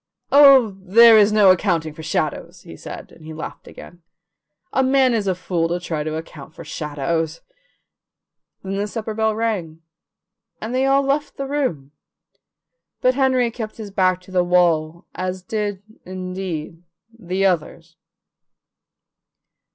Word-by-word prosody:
"Oh, 270 -8 +6
there 225 +5 +7
is 210 -1 +5
no 210 -3 +6
accounting 170 -4 0
for 160 - -11
shadows," 160 -1 -3
he - - -11
said, - - -10
and 160 - -17
he 155 0 -9
laughed 160 - -8
again. 175 - -13 0.7
"A 265 - +2
man 265 -1 +3
is 215 -3 -1
a 185 - +1
fool 175 -2 -2
to 175 +1 -2
try 160 -4 -4
to 155 0 -4
account 155 -1 -9
for - - -10
shadows." 160 +2 -3 1.2
Then 195 0 -4
the 205 +1 -2
supper 220 0 -5
bell 220 0 0
rang, 185 -8 -3 0.8
and 220 +3 -5
they 260 +1 +1
all 275 +1 +3
left 280 +2 -2
the 275 - -3
room, 255 - -3 1.1
but 255 - +3
Henry 260 -3 +1
kept 220 -2 -7
his 210 -3 -8
back 185 -2 +1
to 185 - -16
the 180 -1 +2
wall, 170 -2 +1
as 185 0 -4
did, 205 -1 -3 0.2
indeed, 185 -3 -6 0.4
the 190 0 -1
others. 165 -2 -2
185 Hz, 145 wpm, -21 LUFS, 165-225 Hz, 1.2 s, there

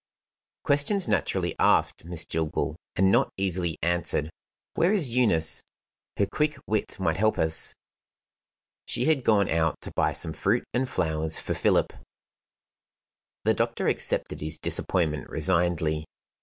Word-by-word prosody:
"Questions 145 +8 +3
naturally 100 -6 0
asked, - - +3
Miss 85 -1 -1
Jillgall 80 -1 -2 0.2
and 95 +1 +4
not - - +3
easily 90 -4 0
answered. 80 -2 0 0.4
Where 175 +3 +2
is 155 - +1
Eunice? 85 -11 +2 0.6
Her 100 - +3
quick 150 +8 -1
wit 110 -2 -2
might 80 -4 0
help 110 +2 +2
us." 80 0 0 1.1
She 120 +1 -1
had 150 -4 +2
gone 105 -4 +3
out 80 -1 0
to - - -6
buy - - +2
some 80 - -3
fruit 105 +9 +1
and 130 +1 0
flowers 80 -2 -1
for - - -3
Philip. - - +2 1.5
The - - +3
doctor - - -1
accepted - - 0
his 75 +1 -3
disappointment 75 -4 0
resignedly. 80 -2 0
90 Hz, 130 wpm, -26 LUFS, 80-115 Hz, 1.5 s, and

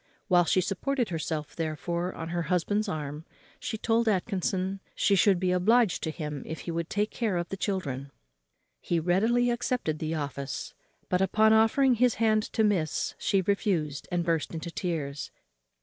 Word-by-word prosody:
While 175 -2 +5
she 185 - +3
supported 245 +7 -1
herself, 160 -2 -3
therefore, 170 +2 -2
on 165 0 -5
her 175 0 -1
husband's 205 +4 +1
arm, 150 -2 -4 0.4
she 220 - -4
told 230 +1 +1
Atkinson 190 -1 0 0.2
she 200 - +2
should 195 -1 +4
be 185 0 +1
obliged 215 +3 +3
to - - -2
him 150 -3 -5
if 160 - -5
he 170 - -4
would 165 0 -3
take 210 +1 0
care 215 -7 -1
of 175 0 -3
the - - -3
children. 145 -10 -3 0.7
He 170 - 0
readily 225 +9 +2
accepted 235 -10 -1
the 160 +1 -2
office; 140 -2 -4 0.3
but, 180 0 +1
upon 220 +3 +4
offering 225 +4 +4
his 245 0 +3
hand 215 -1 +3
to 220 - +2
miss, 180 -8 +1
she 195 -1 +1
refused, 175 -7 0
and 175 -1 0
burst 165 -1 0
into 165 +1 -5
tears. 150 -6 -3
180 Hz, 165 wpm, -28 LUFS, 160-215 Hz, 0.7 s, While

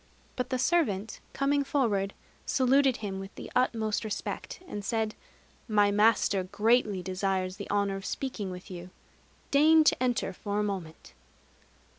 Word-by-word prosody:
But 250 0 -3
the 260 - 0
servant, 245 - 0
coming 280 +1 +1
forward, 215 -9 0 0.3
saluted 265 0 +3
him 195 -3 -5
with 195 +1 -9
the - - -9
utmost 225 -4 +1
respect, 215 -2 -5
and 205 -10 -5
said, 220 0 -1 0.5
"My 205 -2 +3
master 205 -2 +3
greatly 210 0 +1
desires 185 0 -1
the 200 - -7
honor 200 -1 +1
of 195 - -8
speaking 240 -7 -3
with 180 +1 -9
you: 180 0 -8 0.6
deign 315 +3 +6
to 300 - +3
enter 245 -6 0
for 205 +2 -4
a - - +1
moment." 185 -6 -5
210 Hz, 145 wpm, -29 LUFS, 195-255 Hz, 0.6 s, deign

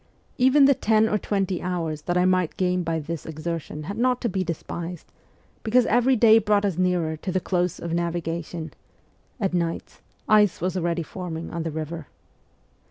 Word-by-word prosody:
Even 265 +3 +6
the 280 - +6
ten 220 -3 +2
or 210 -1 0
twenty 195 -3 -1
hours 165 -4 -3
that 175 +3 -1
I 180 - +3
might 185 -3 +1
gain 180 -1 +1
by 165 -1 -1
this 160 +1 -5
exertion 155 -1 -5
had 200 +8 -5
not 250 0 +2
to 235 - 0
be 190 -1 -1
despised, 170 0 -6 0.5
because 240 +2 +3
every 245 +3 +3
day 225 -1 +6
brought 210 -1 +2
us 195 -4 0
nearer 175 -3 +1
to 185 - -4
the 185 - +1
close 180 -1 -1
of 170 -1 -5
navigation: 170 -1 -3 0.7
at 195 -4 -1
nights, 170 -2 -3 0.3
ice 210 -3 +4
was 180 +2 -2
already 170 -1 -1
forming 165 -1 -6
on 170 - -3
the 165 - -2
river. 160 -1 -5
180 Hz, 175 wpm, -24 LUFS, 165-205 Hz, 0.7 s, Even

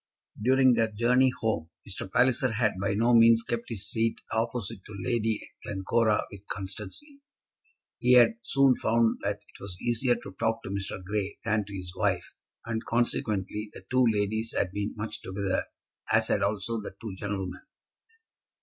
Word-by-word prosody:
During 130 +2 +5
their 115 -1 +2
journey 125 +4 +3
home 85 -8 0 0.2
Mr. 95 -1 -6
Palliser 125 -1 +3
had 105 -2 +2
by 100 0 0
no 115 +3 +3
means 115 0 +7
kept 120 0 -3
his 105 -3 -3
seat 115 +2 +1 0.2
opposite 115 -2 -2
to 105 - -9
Lady 110 +1 0 0.2
Glencora 105 +2 +1
with 100 0 -12
constancy. 105 - -6 0.8
He 125 +1 +4
had 125 - +6
soon 135 - +3
found 115 0 +2
that 100 0 -2
it - - -17
was 100 -3 -6
easier 120 +1 +1
to 100 - -9
talk 115 0 0
to - - -6
Mr. 95 -1 -4
Grey 100 +1 -2
than 110 -2 +1
to 100 0 -8
his 90 -1 -7
wife, - - 0 0.3
and, 115 -1 -2
consequently, 105 -3 -1
the 95 - -12
two 130 -1 +4
ladies 110 +1 -1
had 90 - +1
been 100 +1 -3
much 105 0 -4
together, 95 0 -1 0.5
as - - +3
had - - +2
also 110 +2 -1
the 100 - -8
two 110 -4 -6
gentlemen. 100 -3 -4
110 Hz, 165 wpm, -28 LUFS, 100-120 Hz, 0.8 s, means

